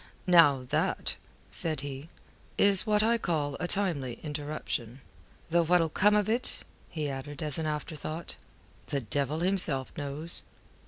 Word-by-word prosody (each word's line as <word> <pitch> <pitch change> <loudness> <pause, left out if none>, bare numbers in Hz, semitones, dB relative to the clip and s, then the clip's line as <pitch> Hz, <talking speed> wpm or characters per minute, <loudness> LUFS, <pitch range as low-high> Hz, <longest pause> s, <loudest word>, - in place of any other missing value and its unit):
"Now 145 -8 +5
that," - - -1 0.4
said 155 -4 +1
he, 140 +2 -7 0.5
"is 200 +1 +5
what 210 0 +3
I 230 +1 +2
call 150 -7 -2
a 175 - -2
timely 165 -12 0
interruption. 145 -5 -5 0.5
Though 170 0 +4
what'll 165 0 +2
come 210 +6 +3
of 210 -2 +2
it," 235 +3 0 0.3
he 155 -3 -3
added 145 +3 -6
as 150 0 +6
an 160 - -2
afterthought, 155 +2 -4 0.5
"the 140 - -2
devil 140 +6 -2
himself 175 -8 0
knows." 145 +4 +2
155 Hz, 140 wpm, -29 LUFS, 140-180 Hz, 0.5 s, as